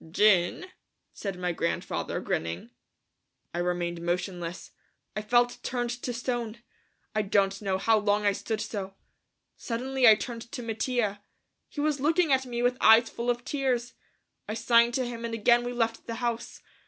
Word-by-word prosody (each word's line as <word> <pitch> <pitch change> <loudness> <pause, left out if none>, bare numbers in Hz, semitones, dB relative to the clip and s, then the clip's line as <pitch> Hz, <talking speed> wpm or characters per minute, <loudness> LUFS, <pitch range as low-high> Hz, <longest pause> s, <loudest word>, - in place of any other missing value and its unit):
"Gin," 190 - +3 0.5
said 195 -3 -5
my 180 0 -1
grandfather, 170 0 -2
grinning. 85 +8 -3 0.8
I 175 - -2
remained 175 -1 -1
motionless. 175 0 -3 0.4
I 210 - -1
felt 240 +3 +2
turned 240 -1 -2
to 245 +1 -4
stone. 240 -2 -3 0.6
I 215 - +2
don't 195 -1 +1
know 195 -2 0
how 220 +3 +3
long 210 0 +1
I 205 - +5
stood 220 +2 -3
so. 200 -4 -5 0.6
Suddenly 255 +2 +1
I 220 - +9
turned 235 +1 -7
to 245 - -4
Mattia. 225 -2 -1 0.5
He 290 - -4
was 300 -1 +1
looking 315 +1 +3
at 265 0 +1
me 240 -1 -2
with 245 +1 +2
eyes 225 +1 +7
full 235 +1 -3
of 245 0 -1
tears. 255 -4 -1 0.6
I 215 - -2
signed 235 +1 +4
to 260 - 0
him 235 -1 -6
and 230 -1 -3
again 240 +2 +4
we 245 - -3
left 230 -2 -1
the 230 - -3
house. 235 -1 -3
230 Hz, 165 wpm, -28 LUFS, 200-245 Hz, 0.8 s, I